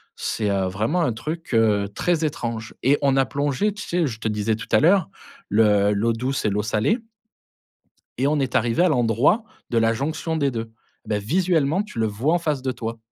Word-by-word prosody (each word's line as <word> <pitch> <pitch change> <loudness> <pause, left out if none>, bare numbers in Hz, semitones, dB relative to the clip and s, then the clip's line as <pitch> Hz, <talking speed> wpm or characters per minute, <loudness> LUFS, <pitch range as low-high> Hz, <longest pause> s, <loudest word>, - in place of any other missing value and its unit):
C'est, 105 -2 -2
heu, 95 -1 0
vraiment 110 - 0
un 125 -8 +1
truc, 155 +9 -6
heu, 105 -3 +3
très 170 -2 +1
étrange 120 -7 -4
et 140 +3 +3
on 135 -1 +2
a 135 - +4
plongé, 145 - -1
tu 210 - -9
sais, 175 -1 0
je 115 -6 -4
te 115 - -3
disais 105 +1 0
tout 110 - -8
à - - +5
l'heure, 180 - +4 0.4
le 105 -1 +3
l'eau 115 +3 +1
douce 130 +4 -2
et - - +3
l'eau 105 +1 0
salée 110 - 0 1.2
et 130 +3 +1
on 150 +1 +1
est 135 -3 -2
arrivé 120 +8 +2
à 180 - +4
l'endroit 125 - +2 0.3
de 120 - 0
la 115 0 +3
jonction 160 +6 -2
des 140 -3 +1
2. 115 -2 -5 0.3
Ben 105 -1 -1
visuellement, 170 - +1
tu 210 - -8
le 110 - +2
vois 115 +10 0
en 175 - +2
face 150 -5 -1
de 130 0 -1
toi. 115 -2 -5
125 Hz, 210 wpm, -23 LUFS, 110-155 Hz, 1.2 s, à